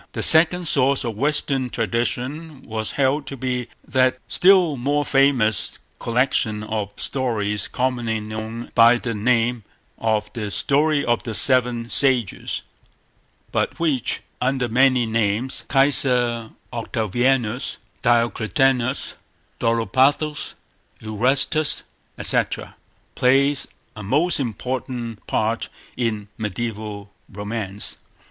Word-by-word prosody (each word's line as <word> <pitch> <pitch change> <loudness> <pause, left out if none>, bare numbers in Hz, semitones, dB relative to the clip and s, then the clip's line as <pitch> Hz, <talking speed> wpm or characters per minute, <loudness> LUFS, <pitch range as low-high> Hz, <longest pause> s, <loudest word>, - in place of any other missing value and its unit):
The - - -2
second 170 +2 +6
source 140 -1 +2
of 115 -3 -4
Western 135 0 0
tradition 125 - -3
was 110 -1 -3
held 140 +1 0
to 135 - -6
be 125 -1 -2 0.2
that 130 -1 +2
still 180 -5 +4
more 145 +3 0
famous 130 -8 +2 0.2
collection 115 -3 0
of 105 -2 -3
stories 110 -6 -1
commonly 120 -3 -1
known 110 +2 -7
by 115 +1 +6
the 120 -1 -4
name 115 +1 +1 0.4
of 105 -1 -1
the 105 -3 -4
"Story 145 +7 +1
of 120 0 +1
the 115 -3 -4
Seven 120 -2 +4
Sages," 130 -7 +2 0.9
but - - -1
which, 150 -8 -1 0.2
under 125 0 0
many 125 +1 +3
names—Kaiser 120 +2 +1 0.2
Octavianus, 120 +1 -1 0.2
Diocletianus, 120 +2 +1 0.5
Dolopathos, 130 +7 +1 0.4
Erastus, 135 +8 +1 0.3
etc.—plays 135 +2 0 0.3
a 105 - -8
most 145 - +3
important 120 -1 -4
part 110 +1 -1 0.3
in 110 -4 -2
mediaeval 105 -1 -5 0.2
romance. 105 0 -5
120 Hz, 95 wpm, -22 LUFS, 110-135 Hz, 0.9 s, second